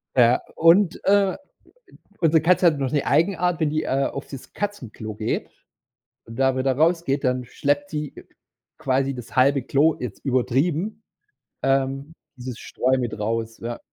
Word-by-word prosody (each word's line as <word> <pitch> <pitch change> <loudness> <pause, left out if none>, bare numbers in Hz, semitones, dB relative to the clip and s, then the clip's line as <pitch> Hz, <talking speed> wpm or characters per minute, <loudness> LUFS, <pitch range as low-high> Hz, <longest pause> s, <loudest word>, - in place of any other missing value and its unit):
Ja, 125 -1 +5
und, 170 +3 +4
äh, 200 -1 +3 0.8
unsere 160 -2 +4
Katze 180 +2 +4
hat 155 -4 +3
noch 135 -2 -1
'ne 145 - +1
Eigenart, 175 +2 +2
wenn 155 - +1
die, 155 +1 -1
äh, 135 +1 0
auf 140 - -6
das 135 -3 -10
Katzenklo 120 - -5
geht 110 +1 -3 0.8
und 115 - -11
da 135 -1 +3
wieder 130 +1 +1
rausgeht, 160 -3 +1
dann 125 0 0
schleppt 145 +9 -1
sie 150 -3 -4 0.6
quasi 135 +1 0
das 125 -1 -10
halbe 135 +1 +3
Klo, 145 +5 +2
jetzt 125 -5 -7
übertrieben 150 - 0 0.6
ähm, 135 +2 0 0.2
dieses 125 -1 -7
Streu 130 +1 0
mit 120 -4 -3
raus, 115 +1 -3
ja. 120 0 -5
135 Hz, 150 wpm, -23 LUFS, 125-165 Hz, 0.8 s, Ja